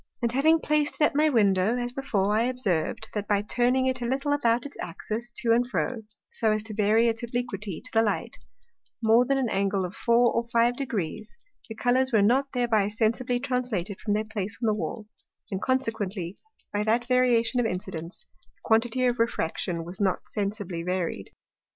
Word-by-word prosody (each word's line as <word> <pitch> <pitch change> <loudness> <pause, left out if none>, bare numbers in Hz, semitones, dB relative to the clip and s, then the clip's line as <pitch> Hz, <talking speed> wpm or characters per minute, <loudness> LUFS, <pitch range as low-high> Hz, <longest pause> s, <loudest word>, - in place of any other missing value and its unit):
And 235 -2 0
having 305 +6 +4
plac'd 300 -1 +1
it - - -10
at 300 - +4
my 305 +1 +4
Window, 205 -2 +3
as 245 0 -3
before, 210 -7 0
I 225 +2 +2
observ'd, 220 -5 -1
that 210 -1 -3
by 205 -1 +2
turning 250 +4 +2
it 260 -1 0
a 240 - -1
little 275 +3 0
about 240 -4 +1
its 285 - -8
Axis 220 +7 -5
to 235 -1 0
and 240 +1 +2
fro, - - 0 0.4
so 220 -2 +1
as 215 0 0
to 220 -1 -6
vary 215 +2 +3
its 225 0 0
obliquity 235 -7 -3
to - - -9
the 225 - +5
light, 215 -2 -1 0.7
more 225 +3 +5
than 275 0 +2
an 260 -4 0
Angle 195 -1 0
of 180 - -7
four 235 0 +3
or 235 0 -1
five 235 0 +3
Degrees, 215 - -4 0.3
the 225 - -6
Colours 255 +3 +2
were 215 -4 +4
not 270 +6 +2
thereby 235 -6 +2
sensibly 230 +4 0
translated 245 -8 -2
from 210 - 0
their 215 +1 -1
place 205 -2 -4
on 225 -3 +1
the 210 - -4
Wall, 185 +6 -4 0.5
and 190 0 -3
consequently 215 -8 -2 0.4
by 205 - 0
that 225 +3 +1
Variation 250 -1 +2
of 240 - +2
Incidence, 180 -3 -6 0.3
the - - -38
quantity 230 +3 +2
of 245 -1 +1
Refraction 170 -5 -1
was 180 +4 -8
not 190 -2 0
sensibly 200 -4 -3
varied. 175 - -3
225 Hz, 190 wpm, -26 LUFS, 205-245 Hz, 0.7 s, the